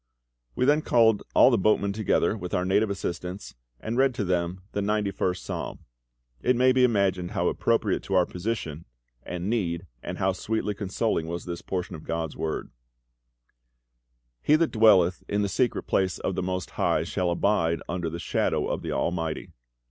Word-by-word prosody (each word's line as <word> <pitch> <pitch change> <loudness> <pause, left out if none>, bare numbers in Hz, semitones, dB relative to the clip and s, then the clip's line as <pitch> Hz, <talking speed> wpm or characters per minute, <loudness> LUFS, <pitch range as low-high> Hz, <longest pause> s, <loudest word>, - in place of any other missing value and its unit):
We - - +1
then 150 +3 +4
called 115 -6 +4
all - - +7
the 120 - +3
boatmen 100 0 +2
together, 105 0 +1
with 90 -5 -4
our 90 - 0
native 100 +3 +2
assistants, 90 -1 -5 0.3
and 115 +3 -3
read 135 -2 +3
to 105 - -1
them 90 0 -1
the 100 - -2
ninety 105 0 0
first 90 -2 -2
Psalm. - - -5 0.6
It 125 - +3
may 130 +2 +5
be 130 0 +3
imagined 100 -6 +1
how - - +1
appropriate - - +1
to 95 - -1
our 90 -1 +5
position 85 -5 -4 0.4
and 90 +1 -5
need 90 -6 -1 0.2
and 90 +1 -5
how 95 -1 +1
sweetly 105 +2 -2
consoling 100 -3 -1
was 85 +1 -5
this 85 -1 -5
portion 90 -2 -4
of 80 - -10
GOD'S 80 -1 -3
Word: 80 - -3 1.7
"He 150 - +4
that 165 +1 +2
dwelleth 95 -6 +5
in 100 0 0
the - - +1
secret 120 +5 0
place 95 -1 0
of 95 - -2
the 95 - -2
MOST 90 0 -3
HIGH - - +1
Shall 90 -1 -1
abide 85 -2 +1
under 85 -1 -2
the 85 - -5
shadow 85 - 0
of - - -2
the - - -4
ALMIGHTY. 80 -3 -2
95 Hz, 180 wpm, -26 LUFS, 90-110 Hz, 1.7 s, all